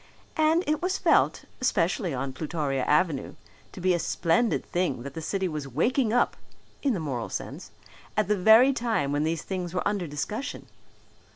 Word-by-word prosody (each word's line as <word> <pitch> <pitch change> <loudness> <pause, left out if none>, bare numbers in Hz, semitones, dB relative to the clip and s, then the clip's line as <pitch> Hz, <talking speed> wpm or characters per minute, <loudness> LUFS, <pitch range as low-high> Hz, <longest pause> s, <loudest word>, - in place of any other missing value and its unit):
And 315 +3 +3
it 305 0 0
was 365 +2 0
felt, - - +2 0.2
especially 190 -5 +1
on 135 0 -3
Plutoria 145 -2 -2
Avenue, 150 -3 +1 0.4
to - - -10
be 185 0 +2
a 175 - +1
splendid 170 +8 +1
thing 175 -9 -1
that 140 0 -7
the 160 - -6
city 190 +4 -1
was 150 -4 -4
waking 220 - +1
up, 245 - +2 0.5
in 270 -5 +1
the - - -2
moral 130 -7 -3
sense, - - -6 0.5
at 215 -3 +2
the 210 - +2
very 220 +8 +6
time 225 - 0
when 145 +1 +1
these 160 0 -1
things 180 -2 -4
were 180 - 0
under 200 -4 -1
discussion. 180 - -4
180 Hz, 175 wpm, -27 LUFS, 150-220 Hz, 0.5 s, very